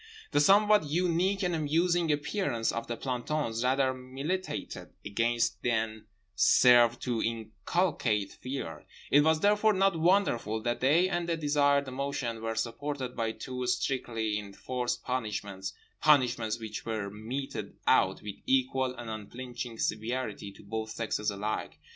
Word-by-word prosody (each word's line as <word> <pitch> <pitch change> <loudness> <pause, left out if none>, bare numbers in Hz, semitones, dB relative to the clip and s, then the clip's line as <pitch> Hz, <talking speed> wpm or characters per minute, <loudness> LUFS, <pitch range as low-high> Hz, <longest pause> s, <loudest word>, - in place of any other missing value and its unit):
The 145 - +3
somewhat 205 +2 +5
unique 180 +4 +1
and 180 -1 +1
amusing 165 +2 +2
appearance 145 - 0
of 115 - -4
the 120 - -3
plantons 125 -2 -2
rather 130 +1 +2
militated 135 +9 -4 0.2
against 115 +3 0
than 110 -2 -1 0.3
served 120 +3 +5
to 120 -3 -1
inculcate 110 - -1
Fear—it 135 - -2
was 160 0 +3
therefore 210 +1 +4
not 195 -1 +3
wonderful 165 - +2
that 120 0 -1
they 155 +8 +4
and 175 -2 -2
the 165 - +1
desired 145 -2 +2
emotion 130 -3 -3
were 115 0 -2
supported 130 +3 -3
by 115 -1 -1
two 125 +2 -5
strictly 115 -4 -1
enforced 120 +5 -4
punishments, 105 -6 -3 0.3
punishments 125 -7 +3
which 110 -2 -6
were 110 -3 -3
meted 120 +6 -5
out - - +3
with 105 -2 -6
equal 130 -1 +1
and 120 -1 -8
unflinching 120 +2 -6
severity 110 -2 -2
to - - -15
both 110 +2 -4
sexes 110 -2 -2
alike. 105 +2 -3
125 Hz, 130 wpm, -30 LUFS, 110-150 Hz, 0.3 s, somewhat